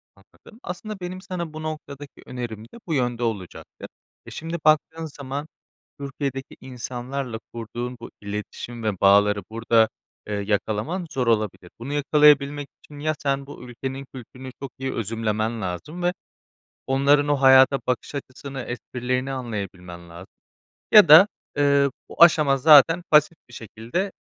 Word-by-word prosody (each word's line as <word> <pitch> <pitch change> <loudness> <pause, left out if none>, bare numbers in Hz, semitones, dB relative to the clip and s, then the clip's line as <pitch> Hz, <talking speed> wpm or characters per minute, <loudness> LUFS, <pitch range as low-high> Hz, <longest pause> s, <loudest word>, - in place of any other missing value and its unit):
Anladım. 225 - -20
Aslında 200 +3 -6
benim 185 +1 -6
sana 175 -4 -6
bu 155 0 -7
noktadaki 145 -2 -8
önerim 120 -4 -6
de 120 - -15
bu 165 - -2
yönde 120 -3 -1
olacaktı. 105 -6 -5 0.4
Eee, - - -11
şimdi 165 +1 -5
baktığın 160 +1 +2
zaman 140 0 -6 0.5
Türkiye'deki 135 -1 -5
insanlarla 125 -1 -5
kurduğun 120 +2 -6
bu 115 - -8
iletişim 105 +3 -6
ve 105 -4 -2
bağları 100 +1 +4
burada, 115 0 +2 0.4
eee, 105 - -4
yakalaman 105 - -2
zor 125 -2 -2
olabilir. 105 -5 -1
Bunu 130 +5 -5
yakalayabilmek 145 -1 +3 0.2
için 145 -1 -13
ya 155 +1 -1
sen 140 -1 -1
bu 145 - -11
ülkenin 130 +2 -6
kültürünü 130 +1 -10
çok 135 -2 -6
iyi 135 0 -3
özümlemen 110 0 -2
lazım 125 - -5
ve 175 0 +1 0.7
onların 140 +2 +3
o 145 - +3
hayata 130 +1 +6
bakış 125 +2 -2
açısını, 135 0 -7
esprilerini 125 +2 -3
anlayabilmen 95 -8 -6
lazım. 85 +3 -13 0.6
Ya 210 -4 +9
da, 160 +7 +10 0.3
eee, 140 -1 +3 0.2
bu - - +5
aşama 155 -5 +5
zaten 155 +4 +6
pasif 150 +2 +4
bir - - -16
şekilde 120 - -4
130 Hz, 140 wpm, -23 LUFS, 115-150 Hz, 0.7 s, da